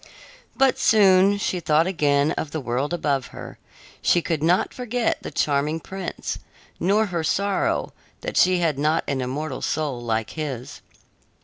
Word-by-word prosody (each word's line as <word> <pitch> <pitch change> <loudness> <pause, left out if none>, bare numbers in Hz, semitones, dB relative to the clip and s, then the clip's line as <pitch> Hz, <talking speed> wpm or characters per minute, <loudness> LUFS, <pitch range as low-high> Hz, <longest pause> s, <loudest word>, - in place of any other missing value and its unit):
But 270 -1 +3
soon 200 -2 +5
she 190 -2 -1
thought 155 0 +3
again 145 -5 +2
of 155 - -3
the 155 - -4
world 130 +3 -2
above 145 -6 -1
her; - - -10 0.4
she 175 - +4
could 165 -3 -2
not 175 +4 +2
forget 245 -1 -1
the - - -6
charming 150 +2 0
prince, 190 +2 -5 0.4
nor 205 +4 +2
her 175 -5 -3
sorrow 200 +5 0 0.3
that - - -5
she 185 0 +4
had 160 -5 0
not 155 +3 +2
an 135 -2 -1
immortal 135 +2 -4
soul 145 -6 -2
like 110 -2 -2
his. 140 -6 -6
160 Hz, 150 wpm, -23 LUFS, 140-185 Hz, 0.4 s, soon